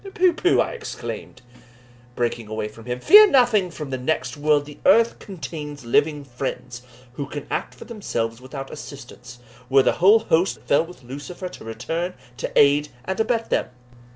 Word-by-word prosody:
"Pooh! 365 Hz, -1 st, +4 dB
pooh!" 360 Hz, +3 st, +2 dB
I -, -, +1 dB
exclaimed, 445 Hz, -, -7 dB, 0.7 s
breaking 120 Hz, -2 st, -2 dB
away 110 Hz, 0 st, -3 dB
from 110 Hz, +1 st, -13 dB
him, 125 Hz, 0 st, -3 dB
"fear 420 Hz, -, +8 dB
nothing 235 Hz, -, +4 dB
from 150 Hz, -4 st, -7 dB
the 130 Hz, -, -2 dB
next 125 Hz, -2 st, -1 dB
world 145 Hz, 0 st, +2 dB
the 145 Hz, 0 st, -12 dB
earth 230 Hz, 0 st, +4 dB
contains 150 Hz, -, -7 dB
living 145 Hz, +5 st, +1 dB
fiends, 125 Hz, -2 st, -6 dB, 0.3 s
who 140 Hz, +2 st, -5 dB
can 145 Hz, 0 st, -6 dB
act -, -, -3 dB
for -, -, -11 dB
themselves 120 Hz, -, -4 dB
without 135 Hz, +1 st, -8 dB
assistance, 125 Hz, -3 st, -10 dB, 0.3 s
were 135 Hz, 0 st, +5 dB
the -, -, +3 dB
whole 200 Hz, +5 st, +8 dB
host 185 Hz, -4 st, +1 dB
that -, -, -23 dB
fell 150 Hz, +3 st, +3 dB
with 175 Hz, -7 st, -14 dB
Lucifer 145 Hz, +9 st, -7 dB
to -, -, -12 dB
return 165 Hz, +11 st, -4 dB, 0.2 s
to -, -, -4 dB
aid 145 Hz, +1 st, +4 dB, 0.2 s
and 190 Hz, +7 st, -3 dB
abet 230 Hz, 0 st, 0 dB
them." -, -, +1 dB
145 Hz, 175 wpm, -23 LUFS, 125-185 Hz, 0.7 s, fear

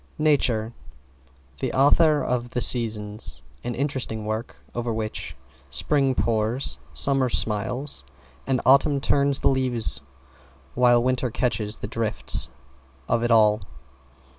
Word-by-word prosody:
=NATURE= 125 Hz, -7 st, +1 dB, 0.9 s
The -, -, -2 dB
author 150 Hz, +3 st, +4 dB
of 120 Hz, -1 st, -2 dB
"The 125 Hz, -, -3 dB
Seasons," 110 Hz, -4 st, +1 dB, 0.2 s
an 120 Hz, 0 st, -4 dB
interesting 130 Hz, -5 st, -3 dB
work 110 Hz, +2 st, -4 dB, 0.2 s
over 120 Hz, 0 st, -3 dB
which 110 Hz, -1 st, -5 dB, 0.3 s
Spring 135 Hz, -, +1 dB
pours, 115 Hz, +3 st, -1 dB
Summer 135 Hz, -2 st, +2 dB
smiles, 115 Hz, +6 st, -1 dB, 0.4 s
and 130 Hz, -2 st, 0 dB
Autumn 140 Hz, +2 st, +4 dB
turns 140 Hz, 0 st, +1 dB
the -, -, +3 dB
leaves 125 Hz, -, +2 dB, 0.7 s
while 120 Hz, -1 st, +4 dB
Winter 125 Hz, 0 st, 0 dB
catches 110 Hz, -2 st, -2 dB
the -, -, -6 dB
drift 115 Hz, -2 st, +1 dB, 0.6 s
of 115 Hz, -, +1 dB
it 120 Hz, -, 0 dB
all. 110 Hz, -2 st, +4 dB
120 Hz, 115 wpm, -24 LUFS, 110-135 Hz, 0.9 s, author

